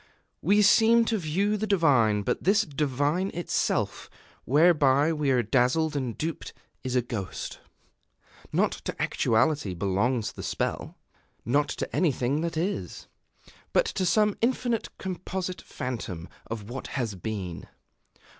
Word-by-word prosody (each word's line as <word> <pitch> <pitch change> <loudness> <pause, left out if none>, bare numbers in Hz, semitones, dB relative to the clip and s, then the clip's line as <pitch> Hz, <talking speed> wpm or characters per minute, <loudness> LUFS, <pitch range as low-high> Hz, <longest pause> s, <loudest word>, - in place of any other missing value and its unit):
We 205 +5 +4
seem 230 +3 +5
to 225 -2 0
view 195 +6 0
the 215 +1 -2
divine; 130 - +3
but - - -1
this 205 +4 +4
divine 150 +3 0
itself, 175 - -1 0.4
whereby 145 0 +4
we 150 -3 0
are 125 -2 +3
dazzled 130 +7 +2
and 130 -5 -2
duped, 160 +1 -4 0.3
is 130 -1 -2
a 125 - +3
ghost. 105 -6 -5 0.9
Not - - +2
to - - -6
actuality 115 -3 +1
belongs 105 +6 0
the - - -9
spell, - - -3 0.5
not 140 +6 +2
to - - -4
anything 140 -3 +1
that 165 -1 -3
is, 185 +5 -3 0.7
but - - +4
to 190 - -1
some 210 +4 +3
infinite 240 -1 0
composite 185 0 -4
phantom 115 - -5 0.2
of 110 -3 -6
what 125 +3 -6
has 120 -5 -1
been. 95 -3 -5
145 Hz, 130 wpm, -27 LUFS, 120-185 Hz, 0.9 s, seem